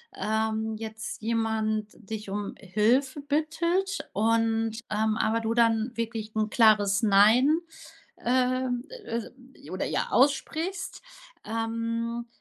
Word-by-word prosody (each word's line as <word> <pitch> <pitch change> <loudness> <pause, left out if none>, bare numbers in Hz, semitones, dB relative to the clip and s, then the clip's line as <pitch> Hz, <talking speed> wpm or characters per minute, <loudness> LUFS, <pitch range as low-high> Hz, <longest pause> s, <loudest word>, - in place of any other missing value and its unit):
ähm, 220 0 -1
jetzt 220 +1 -6
jemand 220 -1 0 0.2
dich 215 -2 -5
um 205 +1 -3
Hilfe 230 +8 +1
bittet 335 +7 -1
und, 225 +1 +1
ähm, 215 +1 +1
aber 230 0 +1
du 225 0 -1
dann 230 0 +2
wirklich 225 -2 -4
'n 215 0 +1
klares 210 -2 +4
„Nein“, 225 +9 +5 0.7
ähm, 255 0 +1 0.2
äh, 250 +3 -7
oder, - - -2
ja, - - -1
aussprichst, 315 +7 0 0.4
ähm, 230 +1 -2
225 Hz, 105 wpm, -27 LUFS, 220-250 Hz, 0.7 s, Nein